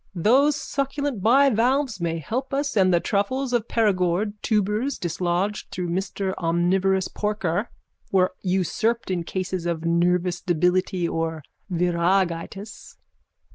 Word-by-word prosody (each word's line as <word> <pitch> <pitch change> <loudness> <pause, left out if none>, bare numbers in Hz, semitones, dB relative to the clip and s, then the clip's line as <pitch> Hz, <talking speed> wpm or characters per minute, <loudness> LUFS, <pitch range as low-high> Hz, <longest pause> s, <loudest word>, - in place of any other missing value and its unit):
Those 265 - +4
succulent 280 -4 -3
bivalves 250 -1 +3
may 165 -1 -1
help 255 - -3
us 285 -1 -1
and 190 -3 +4
the 175 - +4
truffles 245 +8 -1
of 235 -2 +1
Perigord, 200 -2 +1
tubers 215 +5 0
dislodged 180 +4 -2
through 180 -1 -4
mister 190 +2 -2
omnivorous 185 +3 +1
porker, 210 -1 -2 0.4
were 185 -1 +3
unsurpassed 195 +4 0
in 175 -2 -1
cases 185 0 -3
of 165 -1 -2
nervous 175 +1 +1
debility 180 +1 +1
or 165 -2 -3 0.3
viragitis. 180 +3 -1
190 Hz, 115 wpm, -24 LUFS, 175-225 Hz, 0.4 s, Those